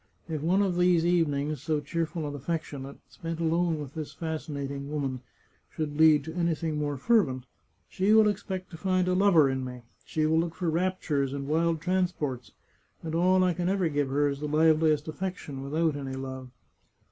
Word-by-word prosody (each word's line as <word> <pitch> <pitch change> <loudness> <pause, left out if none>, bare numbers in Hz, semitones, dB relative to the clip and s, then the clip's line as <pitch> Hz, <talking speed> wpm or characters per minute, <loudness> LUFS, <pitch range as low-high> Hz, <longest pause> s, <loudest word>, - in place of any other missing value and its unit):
If 155 -3 -3
one 185 +6 +3
of 185 -3 0
these 175 -2 +4
evenings, 150 -5 +1
so 155 0 0
cheerful 165 +2 -3
and 145 -1 -4
affectionate, 140 -2 -5
spent 165 0 -6
alone 165 0 +1
with 145 -2 -7
this 155 -2 -6
fascinating 140 -4 -4
woman, 135 -4 -3 0.5
should 150 -2 -3
lead 155 -2 +6
to 160 +2 -7
anything 165 -2 -1
more 145 -1 -2
fervent, 135 - +2 0.4
she 195 +3 0
will 220 -1 +7
expect 190 -2 -3
to 165 - -8
find 185 0 +1
a 180 - +2
lover 180 -6 +5
in 130 -1 -1
me. 125 -1 -7 0.2
She 155 -1 -1
will 160 +1 +3
look 165 0 -2
for 170 -1 -1
raptures 160 -6 0
and 140 -1 -4
wild 165 +1 +1
transports, 175 -8 -1 0.5
and 160 -1 -4
all 185 +2 +4
I 180 -1 +2
can 175 +1 -1
ever 190 -3 +1
give 145 -2 0
her 145 +2 +2
is 140 -1 -2
the 150 - -3
liveliest 155 0 +3
affection, 155 -5 -5
with 140 +2 -5
out 160 -2 +2
any 135 -2 -5
love. 130 -1 -6
160 Hz, 185 wpm, -28 LUFS, 145-175 Hz, 0.5 s, will